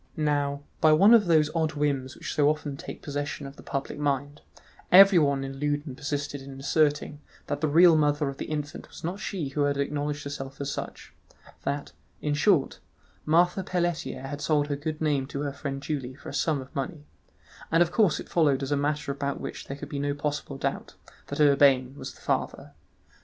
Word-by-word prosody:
Now, 145 -2 0 0.2
by 155 -1 +5
one 200 +9 +7
of 215 -5 +6
those 155 -2 +4
odd 160 -2 0
whims 140 -3 -1
which - - -6
so 145 -1 +4
often 150 -2 -2
take - - -9
possession 145 0 -4
of 135 0 -9
the - - -13
public 140 +1 -4
mind, 145 0 -1 0.5
everyone 170 -8 +7
in 135 0 -6
Loudun 145 -1 -1
persisted 145 0 -4
in 135 0 -10
asserting 150 +1 +1 0.2
that 145 0 -3
the 155 - +2
real 165 +3 +7
mother 150 -1 +2
of 135 0 -5
the - - -4
infant 150 0 -5
was - - -12
not 180 +5 -3
she 175 -11 -3
who 145 +2 -2
had 140 0 0
acknowledged 145 +1 -2
herself 135 -1 -7
as 140 0 -3
such—that, 140 0 -7 0.3
in 150 - -1
short, 145 0 +2 0.5
Marthe 175 +4 +3
Pelletier 175 -6 -2
had 145 +2 -6
sold 150 -2 +1
her 145 - 0
good 155 +2 -5
name 145 -4 +1
to 140 0 -5
her 145 -1 -3
friend 140 -1 -5
Julie 135 -5 -4
for 145 - -10
a - - -8
sum 150 -4 0
of 130 - -13
money; 145 +2 -4 0.7
and 165 +2 +6
of 170 - -5
course 205 -4 +3
it - - -8
followed 145 -5 +2
as 135 - -4
a - - +3
matter 145 0 -1
about 140 0 -3
which - - -7
there 140 - -6
could 145 0 -8
be 145 - -4
no 145 0 -1
possible 145 -1 -3
doubt, - - -3 0.3
that - - -5
Urbain 140 -3 +5
was - - -8
the - - -19
father. - - -2
145 Hz, 200 wpm, -27 LUFS, 140-155 Hz, 0.7 s, one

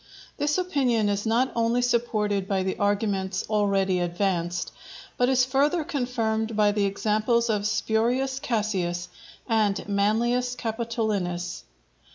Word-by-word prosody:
This 295 +2 +1
opinion 260 - +1
is 205 +2 -1
not 240 +4 +2
only 235 +1 +1
supported 215 -5 0
by 195 -2 0
the 190 - -1
arguments 200 -2 0
already 195 -3 +1
advanced, 175 -1 -1 0.4
but 245 +1 +2
is 255 -1 +4
further 285 +6 +1
confirmed 230 -5 -1
by 210 -1 +4
the 205 -1 +1
examples 215 +4 +1
of 205 -1 0
Spurius 245 +5 0
Cassius 185 -8 -1 0.4
and 215 -5 +1
Manlius 235 +5 +1
Capitolinus. 220 -7 -2
220 Hz, 120 wpm, -26 LUFS, 200-245 Hz, 0.4 s, is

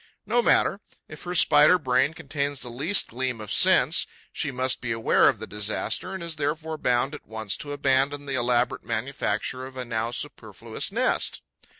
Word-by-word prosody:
No 240 +1 +2
matter: 205 -3 +2 0.3
if 155 - -11
her 180 0 -4
Spider 155 +1 +6
brain 135 0 +1
contains 145 -2 -3
the 120 - -7
least 150 +12 +1
gleam 125 0 -3
of 105 -2 -7
sense, - - +4 0.3
she - - -1
must 130 -1 0
be 120 - -3
aware 115 0 +4
of - - -1
the - - -7
disaster 105 +1 -2
and 190 - -6
is 165 -2 -3
therefore 155 +2 -3
bound 125 +3 +1
at 150 - -10
once 110 -2 -4
to 145 - -6
abandon 140 0 +1
the 140 - -4
elaborate 120 -1 +1
manufacture 115 +1 -3
of 130 0 -13
a 125 - -4
now 115 -1 -2
superfluous 120 - -4
nest. - - 0
130 Hz, 180 wpm, -25 LUFS, 120-150 Hz, 0.3 s, Spider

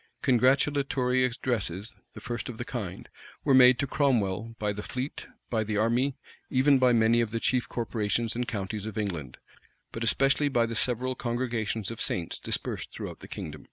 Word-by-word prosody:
Congratulatory 130 0 +3
addresses, 115 -5 -1 0.2
the - - -7
first 120 0 -4
of 120 - -7
the 120 - -4
kind, 110 - -5 0.4
were 140 - +3
made 125 -1 +8
to 140 - 0
Cromwell 115 -6 0
by 105 -1 -1
the 105 - -5
fleet, 130 +6 -5 0.2
by 110 -2 +1
the 105 -1 -2
army, 120 +5 +2 0.3
even 135 +1 +4
by 130 -1 +5
many 115 0 +4
of 115 - 0
the 115 +1 -2
chief 125 +1 +1
corporations 115 -1 -1
and 120 0 -2
counties 105 -2 -4
of 110 - -6
England; 85 -11 -3 0.5
but 115 - -4
especially 135 +5 +3
by 120 -4 +2
the 115 - -4
several 125 +2 0
congregations 115 -4 -2
of 115 - -6
saints 85 -2 -1
dispersed - - -3
throughout - - -7
the - - -11
kingdom. 75 -1 -6
120 Hz, 175 wpm, -28 LUFS, 110-130 Hz, 0.5 s, made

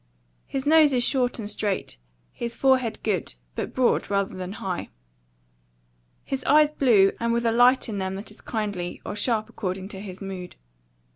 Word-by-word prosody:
His 270 0 -3
nose 305 -1 +6
is 245 -1 +2
short 250 -1 +1
and 220 -3 -5
straight; 200 - -2 0.4
his 235 -1 -4
forehead 255 -5 +2
good, 190 - -1 0.2
but - - -4
broad 255 -2 +2
rather 200 -1 0
than 185 +1 -5
high; 185 -4 -4 1.3
his 270 -1 -3
eyes 300 +1 +5
blue, 225 -10 +4
and 235 0 0
with 235 0 0
a 230 - +3
light 245 +3 +4
in 210 -3 -3
them 190 0 -2
that 200 +2 -7
is 210 - -9
kindly 205 -6 -3
or - - -4
sharp 215 0 0
according 190 -4 -4
to 195 - -8
his 190 -3 -8
mood. 190 -2 -7
215 Hz, 170 wpm, -25 LUFS, 195-250 Hz, 1.3 s, nose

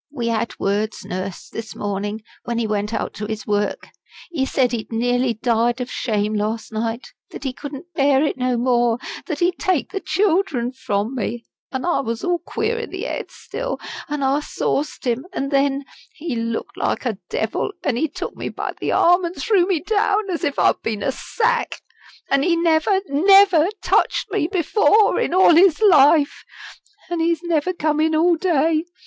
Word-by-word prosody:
"We 240 -5 -2
had 230 0 -2
words, 210 +2 -1
Nurse, 185 0 -5
this 225 -1 -7
morning, 205 +2 -3 0.2
when 235 -1 -3
he 235 - 0
went 210 0 -1
out - - -3
to 210 +1 -5
his 220 -1 -5
work. 205 0 -1 0.4
He 270 -6 -1
said 255 -3 +1
he'd 235 -2 -4
nearly 245 +1 +1
died 235 +1 +1
of 250 0 -4
shame 215 -3 -1
last 215 +1 -2
night; 225 +2 -3 0.2
that - - -9
he 265 -2 -2
couldn't 290 +6 -9
bear 275 -2 +3
it - - -1
no 255 -1 0
more; 240 -1 +2 0.3
that 310 -6 -2
he'd 355 0 +1
take 370 -7 0
the 390 - -2
children 350 - +1
from 215 -3 -2
me. 235 -1 -4 0.3
And 260 +2 -3
I 350 - +1
was 230 -3 -3
all 355 -1 +1
queer 445 +5 -2
in 460 - -5
the - - -6
head - - -4
still, - - -5 0.3
and 295 -1 -2
I 270 +2 +2
sauced 300 -1 -2
him 250 +6 -1
and 275 -5 -3
then 275 0 +1 0.3
he 320 -4 -4
looked 230 0 -3
like - - -1
a 220 -6 -2
devil 220 - -1
and 280 -5 0
he 315 +7 +1
took - - -6
me - - -4
by - - -4
the - - -1
arm 355 +2 +4
and 345 +1 -3
threw 390 -6 +2
me 360 -6 +1
down 415 -1 +1
as 345 0 -3
if 285 -3 -1
I'd - - +3
been 215 -2 -3
a - - +1
sack. 475 - -1 0.5
An' 275 0 +2
he 340 +3 +2
never, 335 +3 +2
never, 370 +2 +5 0.2
touched - - +1
me 310 - +1
before 415 +3 +3
in - - 0
all 370 -2 +6
his 340 -1 +5
life. 305 -7 +5 0.7
An' 345 - -1
he's 335 0 +1
never 340 0 0
come 310 -4 -1
in 315 0 +2
all 340 +2 +4
day. 325 -2 +1
280 Hz, 190 wpm, -21 LUFS, 230-345 Hz, 0.7 s, all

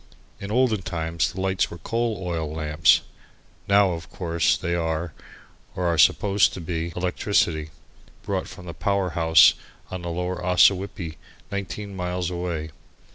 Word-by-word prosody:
In 100 - -6
olden 115 -2 +2
times 80 -2 -2
the 95 - -8
lights 95 0 0
were 85 - -8
coal 115 +3 -2
oil 80 -4 -3
lamps; 75 -1 +3 0.7
now, 100 -1 +4
of 85 -1 -6
course, 85 -3 0
they 85 - -2
are, 80 -1 -2 0.6
or 90 - -2
are 85 -1 +1
supposed 100 +6 +4
to - - -6
be, 85 0 -3
electricity, 90 -3 0 0.5
brought 95 -2 -2
from 90 -1 -11
the 85 - -7
power 100 -1 0
house 80 0 +6 0.4
on 95 -1 -5
the 85 - -5
lower 90 +2 -3
Ossawippi 90 -2 +2 0.3
nineteen 100 0 -5
miles 90 -1 -2
away. 85 -3 -4
90 Hz, 145 wpm, -24 LUFS, 80-95 Hz, 0.7 s, house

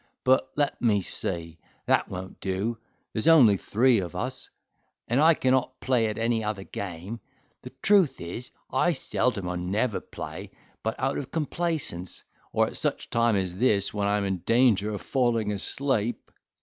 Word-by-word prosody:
But 130 0 +3
let 145 -1 0
me 105 -4 +3
see: 85 -2 -3 0.3
that - - +2
won't 95 +1 -7
do, 100 +5 -2 0.3
there's 110 - -1
only 135 -11 +7
three 115 +5 +3
of 90 -1 -5
us; 130 +7 -3 0.6
and 125 +5 +2
I 165 +1 +6
cannot 130 -1 +1
play 120 -4 +2
at 105 - -3
any 115 0 0
other 105 -2 -3
game. 95 +4 -6 0.4
The - - -8
truth 195 -7 +4
is, 90 +9 -6 0.2
I 170 +6 +3
seldom 105 - -1
or 90 0 -2
never 100 +6 -1
play, - - -8 0.3
but 110 - -3
out 135 +2 0
of 135 - -6
complaisance, 155 - -3 0.3
or - - +3
at - - -6
such - - -1
a - - -32
time 115 -1 +3
as 95 -2 -2
this, 100 -4 +2
when 100 -1 0
I 105 +1 +2
am 100 - -1
in 95 -1 -1
danger 110 -1 +3
of 105 - -4
falling 120 -5 +1
asleep." 120 +2 -1
115 Hz, 170 wpm, -27 LUFS, 100-130 Hz, 0.6 s, only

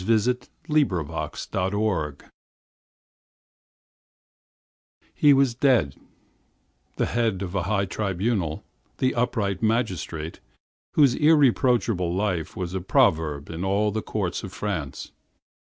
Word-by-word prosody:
THE 115 +4 +1 0.2
DIARY 155 -1 +4
OF 140 - 0
A 80 -5 -3 0.3
MADMAN 95 -7 -1 3.0
He 145 - +5
was 135 -3 +4
dead—the 120 - -3
head 110 -5 0
of 90 -1 -5
a 100 - 0
high 100 +2 0
tribunal, 95 -4 -2 0.3
the 130 - +1
upright 110 -6 -1
magistrate 95 -8 -1 0.6
whose 140 -5 +5
irreproachable 125 - +3
life 95 -5 -1
was 90 -1 -4
a 95 - -2
proverb 75 -4 +1
in 80 +2 -5
all 100 +2 +1
the 110 +1 -2
courts 95 -5 -3
of 95 - -7
France. 90 -10 -4
100 Hz, 105 wpm, -25 LUFS, 90-120 Hz, 3.0 s, He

